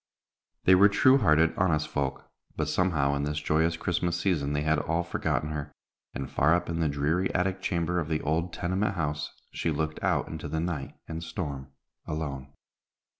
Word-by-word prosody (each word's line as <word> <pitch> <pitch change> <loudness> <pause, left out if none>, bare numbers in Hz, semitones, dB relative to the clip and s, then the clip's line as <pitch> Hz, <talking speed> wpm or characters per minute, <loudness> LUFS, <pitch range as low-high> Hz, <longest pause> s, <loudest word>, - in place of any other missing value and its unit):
They 95 - +6
were 100 +3 +7
true 130 +6 +5
hearted, 80 - +4
honest 80 -5 +2
folk, 70 -1 -3 0.3
but - - -1
somehow 75 -7 +1
in 70 - -1
this 75 +1 -1
joyous 80 +2 +1
Christmas 85 0 -1
season 80 -6 0
they 75 0 0
had 80 0 +2
all 85 +3 0
forgotten 75 -2 -1
her, 75 -1 -4 0.4
and, 65 - -3
far 80 +6 +3
up 90 -1 -2
in 85 - -2
the 80 -2 +2
dreary 75 +6 0
attic 95 +1 0
chamber 85 -1 0
of 80 -2 -3
the 80 -1 +1
old 80 +4 0
tenement 95 +4 -1
house, 75 -3 -2 0.2
she - - -1
looked 80 0 -2
out - - +1
into 80 -1 -6
the 80 - -2
night 80 -5 -3
and 80 +1 -5
storm 75 -6 -5 0.4
alone. 70 -3 -4
80 Hz, 180 wpm, -28 LUFS, 75-85 Hz, 0.4 s, were